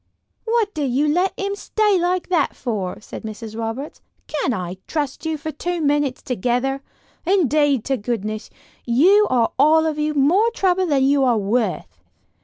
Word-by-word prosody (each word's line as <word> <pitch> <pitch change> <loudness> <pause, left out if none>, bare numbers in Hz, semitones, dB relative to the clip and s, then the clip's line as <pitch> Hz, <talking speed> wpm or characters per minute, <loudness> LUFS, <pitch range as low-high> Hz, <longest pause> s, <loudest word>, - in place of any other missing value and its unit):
"What 455 -2 +1
did 290 -4 -1
you 275 +5 +1
let 360 +6 +1
him 400 0 -2
stay 415 -1 +1
like 355 +1 -1
that 355 -3 +1
for?" 205 -7 -3
said - - -9
Mrs. 220 0 -7
Roberts. 230 +6 -5 0.2
"Can't 295 -3 -1
I 180 -4 -4
trust 295 0 -3
you 320 -1 -1
for 315 +2 -5
two 350 +4 -3
minutes 290 -3 0
together? 250 +2 -1 0.4
Indeed 300 - +2
to 270 -1 0
goodness, 215 -1 -4 0.3
you 365 - +4
are 240 -3 +2
all 315 +3 +5
of 310 -1 -1
you 300 0 -1
more 345 +11 +4
trouble 375 -1 +2
than 280 -4 +2
you 275 0 +3
are 245 -3 +3
worth." 215 +4 -2
285 Hz, 165 wpm, -21 LUFS, 240-345 Hz, 0.4 s, all